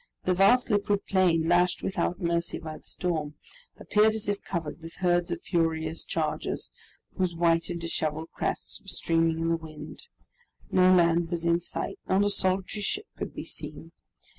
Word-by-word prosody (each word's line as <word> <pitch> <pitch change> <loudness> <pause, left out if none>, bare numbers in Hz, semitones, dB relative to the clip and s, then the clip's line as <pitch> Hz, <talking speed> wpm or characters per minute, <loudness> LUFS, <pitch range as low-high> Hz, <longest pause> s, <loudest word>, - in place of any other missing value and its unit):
The 185 - +2
vast 215 +7 +4
liquid 205 -1 +1
plain, 175 -4 +3
lashed 175 +1 +3
without 180 -2 -1
mercy 170 -1 0
by 155 -1 -7
the - - -28
storm, 155 -5 -2 0.4
appeared 215 +1 +3
as 220 - -2
if 205 0 -1
covered 165 -2 -4
with 165 +1 -9
herds 175 -1 +2
of 170 0 -4
furious 160 -2 0
chargers, - - -2 0.4
whose 185 -3 0
white 165 0 +2
and 170 -1 -3
disheveled 160 -1 -2
crests - - -3
were 200 - -24
streaming 165 -3 +1
in 165 0 0
the 165 - +2
wind. 155 - -9 0.6
No 185 0 +5
land 170 -2 +4
was 170 -1 -2
in 170 0 +3
sight, - - -4
not 190 +2 +4
a 205 - +2
solitary 190 +1 0
ship 410 - -1
could - - -6
be - - -5
seen. - - -6
175 Hz, 170 wpm, -28 LUFS, 165-190 Hz, 0.6 s, No